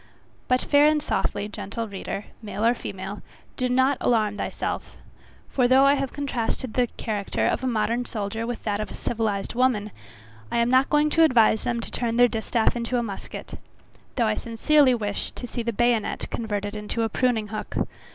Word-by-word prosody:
But 255 0 +2
fair 290 0 +5
and 305 0 +3
softly, 205 -7 -1
gentle 220 +2 -5
reader, 200 0 -5 0.2
male 210 0 -3
or 235 - +5
female, 195 -3 -6 0.3
do 255 -1 -1
not 260 +2 +3
alarm 215 -4 +2
thyself, - - -4 0.5
for 250 -2 +2
though 260 +2 +6
I 280 - +6
have 275 -2 -1
contrasted 255 -4 -2
the 250 -1 +2
character 205 -3 -2
of - - 0
a - - 0
modern 235 +1 0
soldier 220 +1 -3
with 240 -1 -5
that 205 -1 -1
of 215 - -3
a - - -8
civilized 215 -4 -2
woman, 240 -4 +1 0.6
I - - 0
am 235 +1 +2
not 260 +1 +4
going 300 0 +3
to 330 - +5
advise 230 -7 +5
them 240 -1 0
to - - -7
turn 230 -1 -1
their 245 0 +7
distaff 225 0 0
into 240 +1 -1
a 240 - 0
musket, 200 -4 -7 0.6
though 240 - +2
I 215 - +2
sincerely 255 +5 +3
wish 205 -3 -2
to - - -6
see 240 0 -4
the 235 0 -1
bayonet 240 -1 +1
converted 205 -2 -3
into 210 +2 -2
a - - +2
pruning 225 -2 0
hook. 215 0 -5
235 Hz, 190 wpm, -25 LUFS, 215-255 Hz, 0.6 s, their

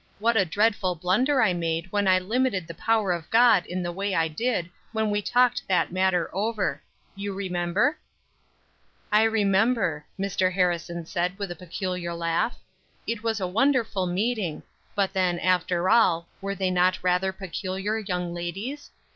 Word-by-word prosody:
What 230 +3 +1
a 200 -3 +4
dreadful 200 0 +1
blunder 245 - +2
I 195 -5 +3
made 165 +1 -2
when 205 -1 +1
I 185 0 +5
limited 205 0 0
the 165 - -8
power 215 +1 +1
of 170 -3 -3
God 225 -5 +5
in 180 +1 -3
the 175 - -2
way 195 +2 -2
I 165 0 +2
did 185 +2 -1 0.3
when 220 -1 0
we 205 0 0
talked 245 +3 +2
that 180 -2 +1
matter 185 -1 +1
over! 215 +1 -1 0.3
you 200 0 -4
remember?" 190 - 0 1.1
"I 210 +1 +5
remember," 220 -4 +2 0.2
Mr. 190 -1 +1
Harrison 170 -2 -1
said 180 +3 -2
with 200 -3 -4
a - - -5
peculiar 180 0 -4
laugh; 170 +7 -1 0.5
"It 230 -2 -3
was 225 -1 -1
a 190 - -1
wonderful 220 -2 +1
meeting, 195 -2 -1 0.3
but 195 -1 0
then, 185 -3 +1
after 180 0 +1
all, 180 -7 +4
were 200 0 -3
they 190 -2 0
not 180 +1 +3
rather 180 +1 +2
peculiar 195 +2 -3
young 180 -4 -3
ladies? 195 +12 -5
190 Hz, 160 wpm, -26 LUFS, 180-220 Hz, 1.1 s, I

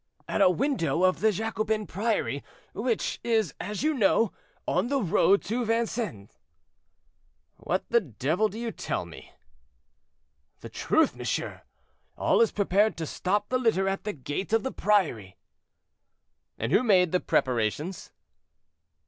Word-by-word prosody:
"At - - -1
a 190 - +7
window 185 - 0
of 185 0 +3
the 220 0 +3
Jacobin 215 +1 -2
Priory, 200 -8 -1 0.3
which 230 +1 -1
is, 220 -7 +1
as 210 +5 -4
you 310 +1 +2
know, 225 -3 +3 0.4
on - - +1
the 275 +1 +1
road 195 -1 +3
to 240 +3 -2
Vincennes." 225 - -2 1.2
"What 185 - -2
the 235 - +5
devil 155 - -1
do 210 - -9
you 235 0 -3
tell 90 - -3
me?" 85 - -13 1.3
"The - - -8
truth, - - +1
monsieur: - - -3 0.6
all - - +3
is 230 - +4
prepared 205 +1 +2
to 165 - -3
stop 200 +6 -1
the 255 - +1
litter 220 -6 +2
at 195 0 -2
the 210 - -3
gate 145 - -5
of 225 - +3
the 265 - -2
priory." 160 - 0 1.2
"And 115 +4 -3
who 200 - +5
made 185 -8 +4
the 180 - +2
preparations?" 130 - -1
205 Hz, 140 wpm, -27 LUFS, 170-225 Hz, 1.3 s, a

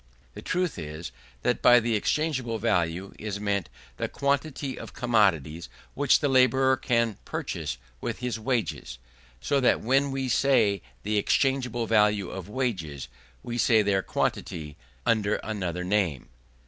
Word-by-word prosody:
The - - -9
truth 180 -2 -1
is, 75 0 -6 0.3
that - - +1
by 120 0 +7
the 115 0 -1
exchangeable 130 0 0
value 90 -4 0
is 105 -2 -4
meant 100 -3 -1 0.3
the - - -1
quantity 140 -1 -1
of - - -9
commodities 85 - +1 0.2
which 145 0 +3
the 145 - +2
labourer 130 0 +4
can 115 -5 0
purchase - - -4 0.2
with - - -3
his 125 -3 -3
wages; 115 - -2 0.4
so 140 - +1
that 125 - +3
when 135 +4 +2
we 135 -1 -2
say 120 -6 +3 0.2
the 105 +1 0
exchangeable 125 0 +1
value 105 -3 +2
of 95 0 -7
wages, 85 - -3 0.3
we 120 0 -4
say 110 -3 +4
their 100 -1 +2
quantity, 75 -5 -3 0.3
under 110 -2 +2
another 90 -5 -3
name. 90 -8 0
110 Hz, 140 wpm, -27 LUFS, 95-130 Hz, 0.4 s, by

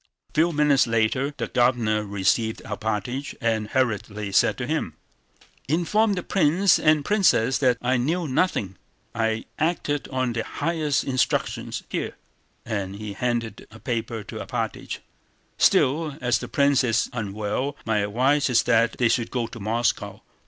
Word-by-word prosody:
A - - -32
few 165 +3 +3
minutes 150 -4 +3
later 115 +5 +1
the - - -2
Governor 120 -4 +2
received 100 +3 0
Alpátych 110 +5 -3
and 110 -3 0
hurriedly 105 -5 -1
said 95 - +3
to - - -3
him: - - -2 0.7
"Inform 190 - +2
the 180 -2 -3
prince 190 +2 +3
and 155 -2 +3
princess 175 - +3
that 125 -3 +3
I 125 +1 +2
knew 160 +7 0
nothing: 130 - 0 0.4
I 110 -1 -1
acted 155 -3 -1
on 130 -2 -1
the 115 -1 -2
highest 155 -2 -1
instructions—here..." 130 -2 -2 0.5
and 100 -4 -3
he 105 0 -6
handed 115 -1 -3
a 110 - -13
paper 115 -2 -3
to - - -8
Alpátych. - - -4 0.6
"Still, 150 +2 +3
as 125 -1 +1
the - - -6
prince 140 -1 +3
is 115 -3 +1
unwell 110 +5 -3
my 110 -2 +1
advice 130 +8 +2
is 120 -2 +4
that 115 -1 +3
they 120 - +2
should 115 0 0
go 120 -2 -1
to 115 +1 -9
Moscow. 115 +3 -1
120 Hz, 145 wpm, -24 LUFS, 110-145 Hz, 0.7 s, is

